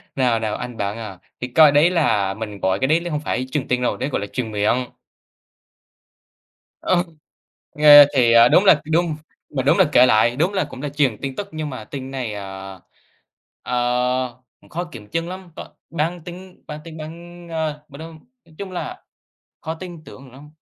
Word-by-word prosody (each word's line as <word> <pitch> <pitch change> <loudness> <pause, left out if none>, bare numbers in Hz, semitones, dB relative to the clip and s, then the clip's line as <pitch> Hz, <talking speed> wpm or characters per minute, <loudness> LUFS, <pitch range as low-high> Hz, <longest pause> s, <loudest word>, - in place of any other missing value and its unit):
Nào, 125 -4 +2
nào, 110 -1 -2
anh 125 -2 -7
bạn 100 +2 -3
à, 105 -5 -8 0.2
thì 125 - -2
coi 150 +3 +6
đấy 150 +4 +5
là 110 - +1
mình 105 -1 -7
gọi 95 +1 0
cái 130 - +1
đấy 160 +3 +3
là 175 - -5
không 150 - -1
phải 130 -3 -2
truyền 145 -3 -2
tin 125 0 0
đâu, 125 - 0
đấy 130 +3 -3
gọi 115 - -2
là 100 - -4
truyền 115 -2 -4
miệng. 105 +5 +1 2.0
Ờ, 175 -1 +2 0.7
nghe 145 -1 +9
thì 120 -3 +4 0.2
đúng 190 - +5
là 150 -6 +6
đúng 165 -1 +1 0.4
mà 130 -3 -2
đúng 145 - +3
là 190 - +6
kể 125 - +7
lại, 120 0 +3
đúng 175 +6 +1
là 190 - +1
cũng 130 - -9
là 145 - -3
truyền 140 -6 0
tin 135 -1 -4
tức 205 - -5
nhưng 155 -1 -4
mà 125 -5 -7
tin 135 0 -7
này, 125 -5 -4
à, 95 -1 -8 0.8
ờ, 125 0 -1 0.3
khó 175 +2 -3
kiểm 115 -11 -12
chứng 165 +1 -3
lắm, 185 -2 -9
có - - -9 0.2
bán 165 +2 -2
tín 180 +1 -11
bán 150 0 -7
tín, 160 -1 -10 0.5
ờ, 155 -2 -3
m 140 - -12
nói 165 +1 -9 0.3
nói 160 -2 -21
chung 195 -2 -7
là 365 - -6 0.6
khó 160 0 -4
tin 175 -2 -10
tưởng 130 -1 -13
lắm. 145 +3 -15
140 Hz, 195 wpm, -21 LUFS, 120-160 Hz, 2.0 s, nghe